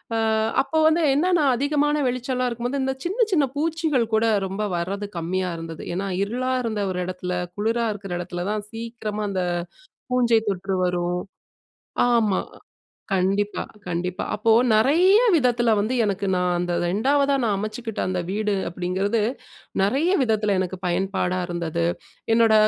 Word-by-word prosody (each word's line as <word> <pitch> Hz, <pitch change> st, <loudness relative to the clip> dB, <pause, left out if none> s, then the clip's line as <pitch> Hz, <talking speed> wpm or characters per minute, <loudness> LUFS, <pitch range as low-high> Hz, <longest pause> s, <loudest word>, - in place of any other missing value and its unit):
அ -, -, +1 dB, 0.4 s
அப்போ 315 Hz, +3 st, -2 dB
வந்து 320 Hz, +2 st, +3 dB
என்னனா, 345 Hz, +2 st, +3 dB
அதிகமா 290 Hz, +3 st, +1 dB, 0.2 s
வெளிச்சலா 255 Hz, 0 st, -1 dB
இருக்கும்போது. 245 Hz, +3 st, -2 dB
இந்த 265 Hz, 0 st, -1 dB
சின்ன 430 Hz, +7 st, +2 dB
சின்ன 320 Hz, -6 st, +4 dB
பூச்சிகள் 310 Hz, -4 st, +1 dB
கூட 220 Hz, +1 st, +3 dB, 0.2 s
ரொம்ப 195 Hz, +2 st, -3 dB
வரது 195 Hz, +4 st, -3 dB
கம்மியா 180 Hz, +2 st, -1 dB
இருந்துது. 165 Hz, -1 st, -7 dB
ஏன்னா, 195 Hz, +2 st, -2 dB, 0.2 s
இருளா 250 Hz, +5 st, -1 dB
இருந்த 220 Hz, -3 st, -2 dB
ஒரு 180 Hz, -, -3 dB
இடத்துல, 180 Hz, 0 st, -4 dB, 0.2 s
குளிரா 225 Hz, +3 st, 0 dB
இருக்கிற 195 Hz, -3 st, -7 dB
இடத்துல 175 Hz, 0 st, -4 dB
தான் 210 Hz, -1 st, -3 dB
சீக்கிரமா 225 Hz, -2 st, -5 dB
அந்த 190 Hz, -2 st, -1 dB, 0.7 s
பூஞ்சை 240 Hz, -3 st, +3 dB
தொற்று 195 Hz, 0 st, -1 dB
வரும். 180 Hz, 0 st, -1 dB, 0.9 s
ஆமா. 220 Hz, -5 st, +3 dB, 0.7 s
கண்டிப்பா. 195 Hz, +2 st, +1 dB, 0.2 s
கண்டிப்பா. 180 Hz, +1 st, -2 dB
அப்போ 220 Hz, +2 st, +1 dB, 0.2 s
நிறைய 325 Hz, -, +5 dB, 0.2 s
விதத்துல 245 Hz, -5 st, +3 dB
வந்து 215 Hz, +5 st, 0 dB
எனக்கு 200 Hz, -1 st, -1 dB
நான் 180 Hz, -1 st, +1 dB
அந்த 175 Hz, 0 st, -1 dB
2வதா 275 Hz, +9 st, +2 dB
நான் 210 Hz, -3 st, +1 dB
அமச்சுக்கிட்ட 215 Hz, +2 st, -4 dB
அந்த 185 Hz, -1 st, -1 dB
வீடு 210 Hz, +1 st, 0 dB
அப்டீங்கிறது 185 Hz, +5 st, -1 dB, 0.6 s
நிறைய 275 Hz, -, +2 dB
விதத்துல 215 Hz, -4 st, +1 dB
எனக்கு 185 Hz, 0 st, -3 dB
பயன்பாடா 185 Hz, 0 st, 0 dB
இருந்தது. 170 Hz, -1 st, -2 dB, 0.5 s
என்னோட 225 Hz, -1 st, +5 dB
210 Hz, 140 wpm, -23 LUFS, 185-250 Hz, 0.9 s, நிறைய